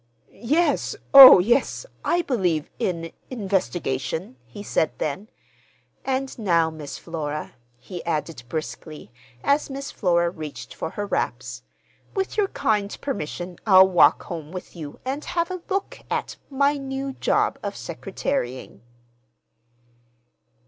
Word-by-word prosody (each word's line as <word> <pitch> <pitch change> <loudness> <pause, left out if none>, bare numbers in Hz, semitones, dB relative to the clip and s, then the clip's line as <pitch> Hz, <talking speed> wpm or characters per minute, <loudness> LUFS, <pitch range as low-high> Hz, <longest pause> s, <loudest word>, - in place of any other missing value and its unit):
"Yes, 305 +9 0 0.2
oh, 270 -2 +13
yes; 235 - +1 0.2
I 345 0 +1
believe 180 - 0
in—investigation," 175 - -3
he 160 +13 -9
said 160 - 0
then. 160 +9 -3 0.7
"And 265 -1 -2
now, 170 -6 +2
Miss 155 -2 -8
Flora," 155 -3 -5 0.2
he 175 +8 -8
added 160 -4 -3
briskly, 155 -5 -6 0.3
as 285 +1 +2
Miss 275 +1 -6
Flora 170 -3 +1
reached 155 -4 -8
for - - -4
her 205 +4 -4
wraps, - - -3 0.5
"with 385 -1 -2
your 415 -2 +2
kind 210 - -1
permission 175 - -5
I'll 190 -1 +8
walk 175 -2 +5
home 160 -3 -7
with 185 0 -8
you 150 -4 -8
and 275 +3 -3
have 340 0 -1
a 365 -1 -5
look 390 0 -2
at—my 280 +1 -1
new 270 0 -4
job - - 0
of - - -4
secretarying." 130 - -4
190 Hz, 120 wpm, -24 LUFS, 160-270 Hz, 0.7 s, oh